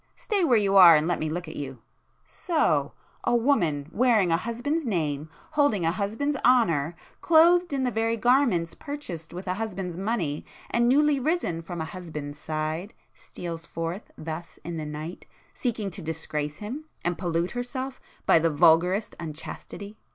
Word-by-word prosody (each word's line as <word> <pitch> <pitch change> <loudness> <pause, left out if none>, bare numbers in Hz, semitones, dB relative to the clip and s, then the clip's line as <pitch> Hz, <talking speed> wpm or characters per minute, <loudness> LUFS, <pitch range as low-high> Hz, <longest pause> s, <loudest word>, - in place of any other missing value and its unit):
Stay 410 -4 0
where 250 -8 +5
you 200 -2 +2
are 175 -4 +10
and 155 +1 +2
let 175 - 0
me 155 - -1
look 170 +2 -4
at 155 - -8
you! 135 -2 -5 0.5
So!—a 240 - -1
woman, 185 - +2
[p 145 - -18
366] - - -10
wearing 225 -8 +4
a 165 - +4
husband's 245 - -2
name, 155 -6 -1 0.2
holding 285 - +2
a 165 - +3
husband's 215 +10 -1
honour, 170 - +3 0.3
clothed 345 +2 +5
in 275 -2 0
the 250 - +1
very 225 0 0
garments 235 -8 +3
purchased 235 - -7
with 180 +2 -7
a 185 - 0
husband's 190 -4 -4
money, 190 -8 -1 0.3
and 235 0 +3
newly 290 +1 +4
risen 265 - 0
from 170 0 -6
a - - -2
husband's 155 -4 -7
side, 155 +5 -3 0.2
steals 165 -2 -7
forth 165 +5 -5
thus 160 +2 -7
in 170 0 -5
the 155 -1 -4
night, 155 +4 -7 0.3
seeking 220 -5 -2
to 185 - -6
disgrace 150 -2 -3
him 250 +9 -6 0.2
and 175 0 +1
pollute 175 -1 0
herself 255 +2 -4 0.2
by - - +6
the 165 +1 +2
vulgarest 175 +6 +3
unchastity! 170 +6 -8
180 Hz, 165 wpm, -26 LUFS, 160-240 Hz, 0.5 s, are